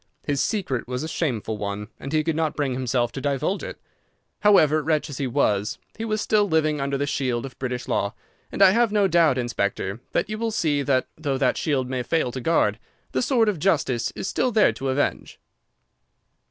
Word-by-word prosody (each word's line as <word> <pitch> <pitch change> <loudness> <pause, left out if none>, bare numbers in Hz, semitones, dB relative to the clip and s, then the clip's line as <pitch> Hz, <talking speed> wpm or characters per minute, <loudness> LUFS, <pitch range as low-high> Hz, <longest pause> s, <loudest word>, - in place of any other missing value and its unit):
His 140 -2 0
secret 140 - -1
was 125 +2 -3
a - - -3
shameful 115 -10 -2
one, 105 +1 -4
and 140 - -6
he 155 0 +2
could 165 0 -1
not 160 -1 0
bring 140 -3 -1
himself 125 -1 0
to 135 - -6
divulge 145 +7 -1
it. - - -7 0.6
However, 155 -7 +5
wretch 155 0 0
as 135 - -7
he 135 - 0
was, 105 -6 +1 0.2
he 225 - -4
was 215 -1 -1
still 210 -2 +2
living 155 -2 +1
under 140 0 -1
the 140 - 0
shield 130 -4 -1
of 135 - -11
British 125 -1 -3
law, 100 +3 -1 0.4
and 200 - +3
I 190 - +8
have 230 +1 +3
no 205 -2 +3
doubt, 165 -7 +4
Inspector, 100 -4 -2
that - - +1
you 215 0 -5
will 230 0 0
see 155 -10 0
that, 135 -2 +1
though 145 -4 -1
that 130 -2 +2
shield 135 -5 0
may 130 -1 -2
fail 125 0 0
to 130 - -5
guard, 120 -8 +2 0.3
the - - 0
sword 240 -3 +2
of 200 -6 0
justice 140 -9 +1
is - - -4
still 250 +5 0
there 215 -2 +4
to 135 - -4
avenge." 135 +2 -1
140 Hz, 205 wpm, -24 LUFS, 125-170 Hz, 0.6 s, I